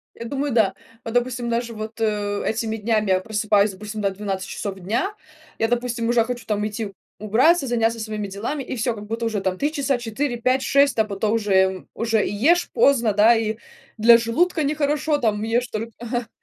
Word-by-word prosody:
Я - - -8
думаю, 280 +3 -2
да. 215 -5 +3 0.3
Вот, 225 - -5
допустим, 245 0 0
даже 235 0 -2
вот, 215 +1 -7
э, 205 -2 -1
этими 220 0 -1
днями 215 -1 0
я 185 0 +3
просыпаюсь, 210 0 +1
допустим, 210 +3 -7
да, 200 -1 +1
в - - -10
12 195 -2 -4
часов 195 -2 -5
дня, 230 - -1 0.5
я, 225 - +1
допустим, 240 -1 -1
уже 235 -1 +3
хочу 240 -1 -5
там 210 -1 -1
идти 210 -1 -4 0.3
убраться, 260 - +3
заняться 230 -1 +1
своими 215 -2 -4
делами, 225 +9 -4
и 260 - -5
всё 235 +1 0
как 210 -1 -9
будто 225 +2 -3
уже 220 -3 -1
там 190 -1 -2
3 290 +2 0
часа, 280 -4 0
4, 240 +3 -2
5, 255 +3 +1
6, 280 -1 +3
а 220 - +4
потом 210 0 -2
уже 190 -4 +2
уже 225 -2 +1
и - - -3
ешь 325 +12 +2
поздно, 260 - +3
да 210 +4 +6
и 220 -1 -1 0.4
для 230 +1 +7
желудка 310 +9 +1
нехорошо, 295 +1 0
там 215 -5 0
ешь 230 +3 0
только 225 -1 -5
ага. 240 0 -4
225 Hz, 200 wpm, -22 LUFS, 210-245 Hz, 0.5 s, для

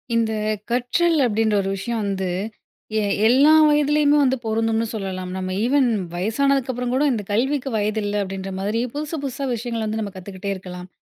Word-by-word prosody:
இந்த 225 -1 +1 0.4
கற்றல் 255 +8 +2
அப்பிடின்ற 220 -2 +1
ஒரு 195 - -3
விஷயம் 225 +4 -3
வந்து, 195 -2 -2 0.7
எ - - +1 0.3
எல்லா 275 +6 +6 0.2
வயதிலேயுமே 295 0 +3
வந்து 265 -1 +2
பொருந்தும்னு 225 0 0
சொல்லலாம். 190 -4 -4
நம்ம 185 0 -3
ஈவன் 265 +2 +3 0.3
வயசானதுக்கு 260 +8 +1
அப்புறம்கூட 250 +3 0
இந்த 220 -4 -2
கல்விக்கு 270 +5 0
வயதில்ல 210 -1 -1
அப்பிடின்ற 195 0 -5
மாதிரி 210 +4 -1
புதுசு, 300 +2 -4
புதுசா 275 0 -3
விஷயங்கள 230 -1 -3
வந்து 215 +1 -2
நம்ம 200 -2 -5
கத்துக்கிட்டே 190 +1 -6
இருக்கலாம். 180 -1 -8
225 Hz, 155 wpm, -22 LUFS, 200-265 Hz, 0.7 s, எல்லா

